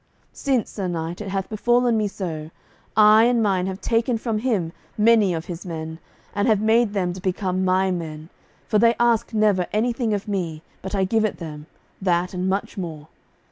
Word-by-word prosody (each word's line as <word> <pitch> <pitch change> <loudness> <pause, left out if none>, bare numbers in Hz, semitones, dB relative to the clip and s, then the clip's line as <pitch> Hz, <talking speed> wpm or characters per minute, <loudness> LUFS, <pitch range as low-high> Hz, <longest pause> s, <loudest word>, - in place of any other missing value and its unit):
Since, 260 -5 0
sir 195 -3 -3
knight, 170 +1 -4
it 210 - -5
hath 195 -1 -2
befallen 240 +2 +2
me 215 -1 +1
so, 165 -6 -5 0.5
I 215 +1 +7
and 240 -1 +3
mine 190 -3 +1
have 190 0 -4
taken 230 +1 +1
from 225 -1 -2
him 205 -9 -1 0.2
many 215 -2 +5
of 165 -1 -3
his 175 -1 -7
men, 160 -2 -6 0.3
and 205 0 0
have 215 -3 +4
made 220 0 +3
them 180 -3 0
to 185 - -9
become 185 0 -1
my 185 +1 +2
men, 160 -2 -5 0.4
for 210 - +2
they 230 +1 +5
ask 235 -2 +2
never 210 -5 +2
anything 230 0 0
of 200 - -5
me, 170 -6 -3 0.2
but 190 +2 -4
I 195 - +2
give 220 +3 +1
it 215 - -1
them, 150 -3 -8 0.3
that 180 -1 +1
and 185 +1 -1
much 195 +1 -2
more. 160 -4 -6
195 Hz, 190 wpm, -23 LUFS, 175-220 Hz, 0.5 s, I